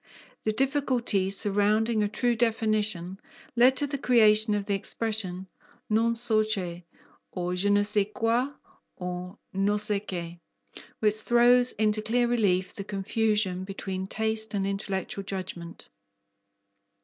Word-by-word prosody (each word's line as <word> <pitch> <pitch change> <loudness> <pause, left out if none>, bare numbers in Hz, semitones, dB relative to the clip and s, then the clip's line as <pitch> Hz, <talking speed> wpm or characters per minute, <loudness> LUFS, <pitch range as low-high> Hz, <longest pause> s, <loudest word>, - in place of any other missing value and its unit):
The 215 - 0
difficulties 245 -7 0
surrounding 210 +2 +1
a 210 - +2
true 240 +3 0
definition 215 -5 0 0.4
led 255 +2 +5
to 290 - +3
the 280 -1 -4
creation 215 -4 +4
of 205 -1 -2
the 205 - -1
expression 195 -2 -2 0.4
non 230 +2 +2
so 225 -2 +2
che, 180 -5 -3 0.5
or 180 -1 -3
je 185 +3 0
ne 205 0 +4
sais 205 -1 +1
quoi, 230 +5 0 0.5
or 180 0 -6 0.2
no 200 +2 +1
se 210 -1 +1
qué, 175 -4 -7 0.6
which 215 -1 +4
throws 245 +2 +4
into 215 0 +1
clear 240 +3 +1
relief 195 -6 +1
the 200 - -6
confusion 200 -1 -1
between 190 -1 -5
taste 220 +1 -1
and 195 -1 0
intellectual 195 0 -3
judgment. 185 -3 -7
210 Hz, 130 wpm, -27 LUFS, 190-225 Hz, 0.6 s, led